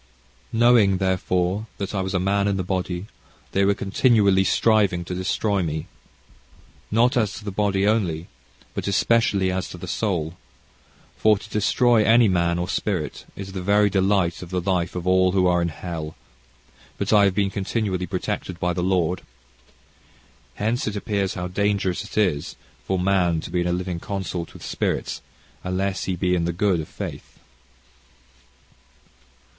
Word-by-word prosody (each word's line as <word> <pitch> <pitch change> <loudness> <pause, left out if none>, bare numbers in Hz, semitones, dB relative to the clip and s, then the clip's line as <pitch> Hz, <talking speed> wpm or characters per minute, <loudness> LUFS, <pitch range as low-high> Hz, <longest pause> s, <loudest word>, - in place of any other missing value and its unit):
"Knowing, 115 -4 +4
therefore, 95 +2 0
that 100 0 -4
I 100 - 0
was 95 0 -3
a - - +2
man 100 +2 +1
in 100 -1 +1
the 95 - -1
body, 90 0 -2 0.5
they 100 - +2
were 100 +1 +3
continually 100 -2 +3
striving 100 -4 +2
to 90 - -5
destroy 95 +2 0
me, 80 -2 -3 1.0
not 120 +4 +3
as 110 -5 +1
to 110 - -9
the 100 - -3
body 100 0 +1
only, 90 -7 +1 0.5
but - - -4
especially 100 -2 +2
as 95 0 -3
to - - -8
the 90 - -8
soul; 85 -5 -1 0.8
for 110 -1 +4
to - - -11
destroy 115 +2 +3
any 115 +1 +5
man 85 -2 +1
or 90 0 -2
spirit 95 -6 -2
is 95 -1 -7
the 95 -1 -5
very 100 +2 +3
delight 95 -3 +1
of 90 - -8
the 90 0 -1
life 90 -1 -1
of 90 -1 -4
all 95 0 +3
who 95 -1 +3
are 90 -1 +3
in 85 - 0
hell; 80 -1 -6 0.8
but - - 0
I 105 -1 +6
have 95 -2 +1
been 100 -1 +1
continually 95 -2 -2
protected 90 -1 -4
by 90 0 0
the 90 - -2
Lord. 90 -1 +1 1.3
Hence 110 +4 -1
it 105 - -2
appears 100 -2 -1
how 90 0 -3
dangerous 100 0 0
it 105 - -10
is 90 -9 +1 0.3
for 95 - 0
man 90 -3 +2
to - - -8
be 90 0 +1
in 85 - -1
a - - +1
living 90 -1 -2
consort 95 -3 -4
with - - -10
spirits, - - -2 0.4
unless 95 +1 -1
he 95 - -1
be 90 0 0
in 85 -2 +1
the 85 - -1
good 90 0 +1
of 80 - -5
faith."... - - -8
95 Hz, 170 wpm, -23 LUFS, 90-100 Hz, 1.3 s, I